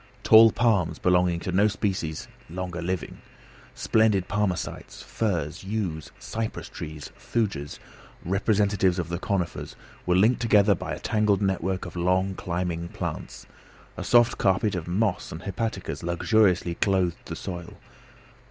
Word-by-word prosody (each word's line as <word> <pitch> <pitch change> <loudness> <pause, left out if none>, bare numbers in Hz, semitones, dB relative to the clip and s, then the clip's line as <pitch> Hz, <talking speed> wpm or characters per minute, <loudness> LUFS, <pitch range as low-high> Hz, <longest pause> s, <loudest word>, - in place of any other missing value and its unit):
Tall 110 0 +8
palms, 100 -10 +1
belonging 90 -1 +2
to 100 +4 +2
species 95 -6 -3 0.2
no 90 +3 -5
longer 90 -2 -5
living, 90 +1 -4 0.6
splendid 105 -4 +2
palmacites, 100 -3 -3
firs, 85 -7 -2
yews, 95 -6 -3
cypress 110 0 -5
trees, 75 -1 -8
thujas, 100 -11 -2 0.5
representatives 95 -1 +2
of 85 -3 -3
the 85 0 -3
conifers, 95 -4 -3 0.3
were 90 - +3
linked 110 +7 +3
together 105 -3 +5
by - - -4
a - - -10
tangled 105 -2 +1
network 95 -1 -1
of 85 - -9
long 90 +2 +1
climbing 85 -2 -3
plants. - - -6 0.5
A - - -5
soft 120 0 +4
carpet 100 +2 +2
of 85 -3 -4
moss 95 +2 -1
and 80 +3 -7
hepaticas 110 +3 -3
luxuriously 90 0 +2
clothed 95 -2 0
the - - -6
soil. 85 -2 -7
95 Hz, 135 wpm, -26 LUFS, 85-105 Hz, 0.6 s, Tall